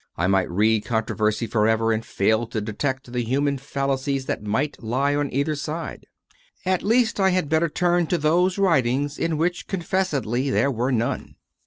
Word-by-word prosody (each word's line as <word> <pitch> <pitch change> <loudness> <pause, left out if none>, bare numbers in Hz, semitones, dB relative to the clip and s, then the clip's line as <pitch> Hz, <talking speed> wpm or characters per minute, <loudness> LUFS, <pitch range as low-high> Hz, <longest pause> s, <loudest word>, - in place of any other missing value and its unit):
I 85 - +1
might 95 -1 +2
read 105 +4 +2
controversy 110 -1 0
for 110 -1 +1
ever 115 0 +2
and 110 0 0
fail 110 +3 +1
to 115 -1 -3
detect 130 +5 -3
the 125 - 0
human 140 +3 0
fallacies 135 0 -2
that - - -3
might 110 +8 -2
lie 130 +5 0
on 145 -1 -1
either 140 +4 0
side; 155 +3 -5 0.6
at 185 -1 +1
least 230 0 +2
I 190 -1 +4
had 180 -5 0
better 160 +2 +2
turn 175 +1 +1
to 175 - +1
those 175 +5 +2
writings 145 -6 +1
in 165 -2 0
which 175 +3 -1
confessedly 150 - -1
there 140 +1 +2
were 125 +2 -1
none. 120 -2 -2
135 Hz, 175 wpm, -23 LUFS, 115-165 Hz, 0.6 s, I